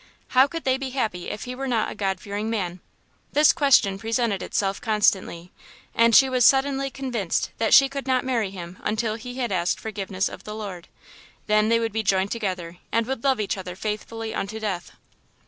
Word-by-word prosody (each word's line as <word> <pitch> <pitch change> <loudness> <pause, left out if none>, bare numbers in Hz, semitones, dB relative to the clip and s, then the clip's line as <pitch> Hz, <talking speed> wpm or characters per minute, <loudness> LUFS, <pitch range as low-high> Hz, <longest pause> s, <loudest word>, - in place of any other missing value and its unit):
How 260 +2 +5
could 330 +3 -6
they 260 0 +1
be 270 -1 -4
happy 220 -9 -2
if - - -5
he 250 - -5
were 270 +2 -4
not 230 -4 0
a - - -5
God 195 -2 -2
fearing 205 +2 -4
man? 185 -5 -2 0.5
This 300 0 +6
question 255 -10 +3
presented 225 -2 0
itself 195 -1 -1
constantly, 195 -5 +1 0.4
and 230 -1 +4
she 270 - +8
was 255 -1 +1
suddenly 270 +1 +3
convinced 245 -9 -2
that 225 -1 +1
she 275 - +8
could 275 0 -6
not 260 0 +1
marry 235 -6 0
him 180 -1 -9
until 215 +1 -1
he 245 +2 -7
had 250 -4 -2
asked 180 -1 0
forgiveness 195 -3 -3
of - - -9
the 210 - -7
Lord. 195 -5 -7 0.6
Then 215 0 +3
they 230 0 +4
would 225 -2 -2
be 220 - 0
joined 195 -1 +1
together, 185 -6 -3
and 230 0 +1
would 265 -1 -4
love 270 -3 +2
each 205 -2 -2
other 180 -1 -7
faithfully 220 +2 -4
unto 215 +3 -4
death. 195 -5 -4
220 Hz, 200 wpm, -24 LUFS, 195-255 Hz, 0.6 s, she